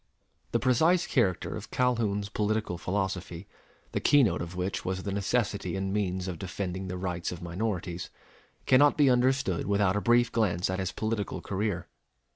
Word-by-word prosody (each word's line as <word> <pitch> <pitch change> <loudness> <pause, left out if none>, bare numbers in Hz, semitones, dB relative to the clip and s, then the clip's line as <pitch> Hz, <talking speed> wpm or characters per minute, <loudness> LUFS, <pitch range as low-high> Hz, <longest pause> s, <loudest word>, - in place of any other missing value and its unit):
The - - +3
precise 160 +8 +3
character 95 -9 0
of - - -7
Calhoun's 110 -5 0
political 105 -4 -1
philosophy, 95 -2 -3 0.4
the - - -1
keynote 140 -8 +4
of 85 +1 -6
which 90 +2 -2
was 95 0 -3
the 100 - -3
necessity 100 -2 -1
and 95 0 -2
means 95 -3 -1
of 90 -3 -5
defending 95 0 -4
the 90 0 -4
rights 90 -2 -3
of 85 -1 -7
minorities, 90 -1 -3 0.6
cannot 145 +3 +5
be 140 -3 +5
understood 125 -8 +1
without 100 -1 +2
a 105 - 0
brief 120 +1 +3
glance 95 -6 +1
at 95 - -2
his 95 -1 -2
political 110 +1 -2
career. 100 -3 -2
100 Hz, 160 wpm, -29 LUFS, 90-115 Hz, 0.6 s, cannot